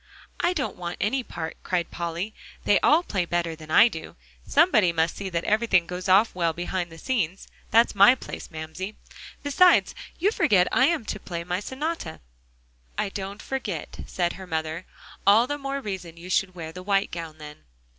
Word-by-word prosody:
"I 350 Hz, -, +2 dB
don't 290 Hz, -6 st, -3 dB
want 175 Hz, -1 st, -5 dB
any 255 Hz, +7 st, +1 dB
part," 165 Hz, -8 st, -6 dB
cried 175 Hz, -2 st, -1 dB
Polly; 170 Hz, +5 st, -4 dB, 0.3 s
"they 205 Hz, -, +4 dB
all 320 Hz, +4 st, +4 dB
play 195 Hz, -, -1 dB
better 170 Hz, -1 st, -1 dB
than 155 Hz, -1 st, -13 dB
I 220 Hz, +8 st, +7 dB
do. 160 Hz, -8 st, -7 dB, 0.3 s
Somebody 215 Hz, -, +4 dB
must 165 Hz, 0 st, 0 dB
see 195 Hz, -1 st, -5 dB
that 170 Hz, -1 st, -2 dB
everything 215 Hz, -5 st, +3 dB
goes 180 Hz, +2 st, -5 dB
off 200 Hz, +5 st, +5 dB
well 170 Hz, -2 st, 0 dB
behind 175 Hz, +1 st, -3 dB
the 165 Hz, -, -11 dB
scenes; 195 Hz, -4 st, -2 dB, 0.2 s
that's 230 Hz, +1 st, +4 dB
my 200 Hz, +6 st, +7 dB
place, -, -, -8 dB
Mamsie. 160 Hz, +6 st, -6 dB, 0.5 s
Besides, 350 Hz, +6 st, +5 dB, 0.2 s
you 390 Hz, +5 st, +2 dB
forget 210 Hz, -, +3 dB
I 260 Hz, -, +4 dB
am 330 Hz, -9 st, 0 dB
to 210 Hz, -, -4 dB
play 170 Hz, -2 st, -5 dB
my 180 Hz, +1 st, -2 dB
sonata." 265 Hz, -, -4 dB, 0.8 s
"I -, -, 0 dB
don't 195 Hz, +1 st, -6 dB
forget," 215 Hz, -, -4 dB
said 175 Hz, -1 st, -1 dB
her 190 Hz, 0 st, -10 dB
mother; 160 Hz, +1 st, -3 dB, 0.4 s
"all 215 Hz, +4 st, +7 dB
the 290 Hz, +3 st, -3 dB
more 275 Hz, 0 st, -3 dB
reason 190 Hz, -8 st, -6 dB
you 175 Hz, +2 st, -8 dB
should 185 Hz, 0 st, +1 dB
wear 160 Hz, -2 st, -6 dB
the 180 Hz, +2 st, -9 dB
white 195 Hz, +1 st, +1 dB
gown, 165 Hz, -2 st, -6 dB
then." 150 Hz, -1 st, -10 dB
185 Hz, 185 wpm, -25 LUFS, 170-230 Hz, 0.8 s, I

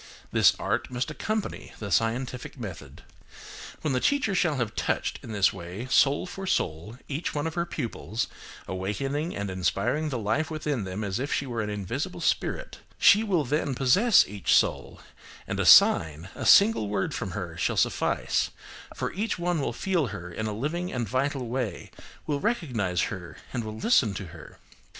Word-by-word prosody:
This -, -, +5 dB
art -, -, -1 dB
must 125 Hz, +3 st, -2 dB
accompany 215 Hz, +6 st, -3 dB
the 100 Hz, -3 st, -6 dB
scientific 125 Hz, +6 st, -1 dB
method. 80 Hz, -, -8 dB, 0.8 s
When 150 Hz, -, 0 dB
the 125 Hz, -, +2 dB
teacher 275 Hz, -, +1 dB
shall 175 Hz, -4 st, +2 dB
have 120 Hz, -5 st, -2 dB
touched, -, -, -1 dB
in 115 Hz, -, -9 dB
this 100 Hz, -3 st, +3 dB
way, 95 Hz, +5 st, -7 dB
soul 140 Hz, +4 st, +4 dB
for 190 Hz, +1 st, -7 dB
soul, 90 Hz, -, -1 dB
each 150 Hz, +3 st, -3 dB
one 145 Hz, +1 st, -1 dB
of 160 Hz, -, -2 dB
her 170 Hz, 0 st, -1 dB
pupils, 115 Hz, -, -3 dB, 0.4 s
awakening 135 Hz, -, -2 dB
and 100 Hz, -1 st, -3 dB
inspiring 110 Hz, -, 0 dB
the 130 Hz, -, -2 dB
life 115 Hz, +8 st, 0 dB
within 150 Hz, -8 st, -2 dB
them 95 Hz, +3 st, -4 dB
as 100 Hz, +1 st, -2 dB
if 140 Hz, +3 st, -3 dB
she 140 Hz, -, 0 dB
were 120 Hz, -3 st, -3 dB
an 105 Hz, -, -3 dB
invisible 125 Hz, -, -4 dB
spirit, -, -, -1 dB, 0.2 s
she 215 Hz, 0 st, +6 dB
will 185 Hz, -8 st, +1 dB
then 145 Hz, 0 st, 0 dB
possess 190 Hz, -, +5 dB
each 100 Hz, -1 st, +1 dB
soul, -, -, +1 dB, 0.5 s
and -, -, -3 dB
a -, -, +1 dB
sign, 80 Hz, +2 st, +6 dB
a -, -, -3 dB
single 200 Hz, -, +6 dB
word 100 Hz, -2 st, -1 dB
from 95 Hz, -, -4 dB
her 90 Hz, -4 st, -5 dB
shall -, -, -1 dB
suffice; -, -, +1 dB, 0.5 s
for -, -, -3 dB
each 210 Hz, +4 st, -2 dB
one 175 Hz, -2 st, 0 dB
will -, -, -1 dB
feel 175 Hz, -7 st, 0 dB
her 95 Hz, -4 st, -7 dB
in 110 Hz, +5 st, -3 dB
a -, -, -2 dB
living 155 Hz, +11 st, -3 dB
and 120 Hz, -3 st, -2 dB
vital 130 Hz, +2 st, -1 dB
way, 115 Hz, -6 st, -3 dB, 0.3 s
will 145 Hz, -2 st, -1 dB
recognise 125 Hz, -, 0 dB
her 90 Hz, -3 st, -8 dB, 0.2 s
and 120 Hz, -3 st, -2 dB
will 110 Hz, 0 st, -6 dB
listen 115 Hz, -, +3 dB
to 100 Hz, -, -5 dB
her. 80 Hz, -1 st, -12 dB
125 Hz, 180 wpm, -27 LUFS, 100-155 Hz, 0.8 s, she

